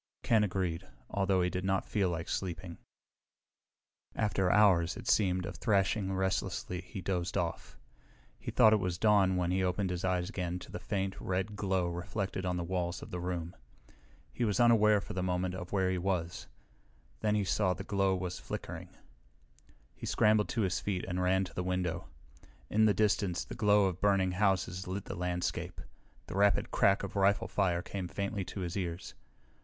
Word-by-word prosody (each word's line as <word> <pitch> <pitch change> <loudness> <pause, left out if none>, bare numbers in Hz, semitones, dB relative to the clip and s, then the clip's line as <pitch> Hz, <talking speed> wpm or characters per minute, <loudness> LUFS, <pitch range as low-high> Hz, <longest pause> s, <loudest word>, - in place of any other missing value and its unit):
Ken 110 -2 +4
agreed, 90 -3 -2 0.2
although 95 -2 +2
he 90 - +1
did 90 - -3
not 95 0 0
feel 100 -4 +1
like 85 -1 -3
sleeping. 85 -2 -4 1.4
After 95 -4 +1
hours, 90 -5 +4
it 120 - -9
seemed, 90 -3 +2
of - - -6
thrashing 100 -2 +1
restlessly 95 -1 -1
he 95 +2 -8
dozed 90 -1 -2
off. - - -3 0.6
He - - -6
thought 110 - +6
it 110 - +4
was 90 -2 -2
dawn 100 -2 +4
when 90 -1 0
he 95 +1 +1
opened 90 +1 0
his 90 0 -3
eyes 90 -1 0
again 90 -4 -3
to 90 - -11
the - - -5
faint, 95 -1 -3
red 95 +3 -2
glow 95 -3 0
reflected 95 +2 -3
on 90 0 0
the 85 - -2
walls 85 0 -2
of - - -10
the 90 - -3
room. 90 -1 -4 0.8
He - - -2
was 105 0 +1
unaware 110 -3 +5
for - - -7
a 90 - -2
moment 90 0 -1
of 90 -1 -7
where 95 -2 +1
he 90 - -1
was. 90 -2 -2 0.7
Then 105 -1 +1
he 105 - +2
saw 95 -1 +1
the - - -6
glow 95 -1 +1
was 90 -1 -4
flickering. - - -6 1.0
He - - -8
scrambled 105 -1 +3
to 115 - 0
his 90 -4 0
feet 95 -3 -2
and 90 0 -2
ran 95 +1 +3
to 95 - -8
the - - -2
window. 90 -1 -2 0.6
In 110 +1 +4
the 105 - +4
distance 100 -4 +1
the - - -8
glow 105 -1 +4
of 95 -2 -2
burning 100 -2 +3
houses 95 -1 0
lit 95 +1 -4
the - - -5
landscape. 90 0 -3 0.5
The - - -8
rapid 100 -2 +3
crack 100 0 +3
of 100 +1 -6
rifle 100 0 +3
fire 90 -3 0
came 95 -3 -4
faintly 100 +2 -3
to 95 - -6
his 85 -1 -4
ears. 90 -3 -4
95 Hz, 185 wpm, -32 LUFS, 90-100 Hz, 1.4 s, thought